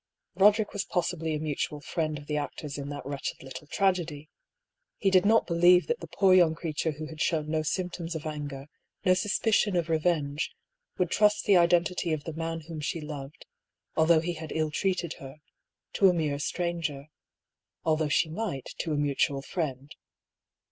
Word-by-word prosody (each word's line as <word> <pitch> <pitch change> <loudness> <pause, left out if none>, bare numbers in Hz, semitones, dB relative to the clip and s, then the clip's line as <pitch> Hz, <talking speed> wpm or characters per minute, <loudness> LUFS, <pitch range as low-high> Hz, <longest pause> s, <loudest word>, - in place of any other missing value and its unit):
Roderick 210 +2 +4
was 205 - -1
possibly 170 -3 -1
a - - -2
mutual 150 -1 -2
friend 155 0 -2
of 145 - -10
the 150 - -3
actors 145 0 -4
in 140 0 -5
that 145 -2 -6
wretched 140 -1 -5
little 135 +3 -9
tragedy. 165 -5 0 0.7
He 195 - +1
did 185 +1 +5
not 225 +1 +5
believe 175 +1 +5
that 475 - -1
the - - -8
poor 195 -2 +3
young 175 -3 +5
creature 160 -1 -2
who 155 +2 -7
had 155 0 -8
shown 155 -2 0
no 160 -1 +1
symptoms 170 +1 -3
of 160 - -5
anger, 145 -3 -5 0.4
no 185 - +6
suspicion 205 +1 +1
of 170 -2 0
revenge, 155 -3 0 0.4
would 180 -2 0
trust 210 0 +3
the 200 - +5
identity 175 0 +2
of 150 -2 -3
the 165 - -6
man 165 +1 -3
whom 160 0 -7
she 165 +2 -2
loved, 150 -2 -8 0.5
although 160 0 +5
he 175 +1 -2
had 160 -1 -8
illtreated 170 +2 -1
her, 135 +2 -10 0.6
to 195 - +5
a - - +3
mere 150 -4 -1
stranger 160 -3 -3 0.4
— - - -63
although 155 -1 +2
she 160 - +3
might 160 - -4
to 160 - -1
a - - 0
mutual 140 -1 0
friend. 140 -4 -4
160 Hz, 175 wpm, -28 LUFS, 150-180 Hz, 0.7 s, no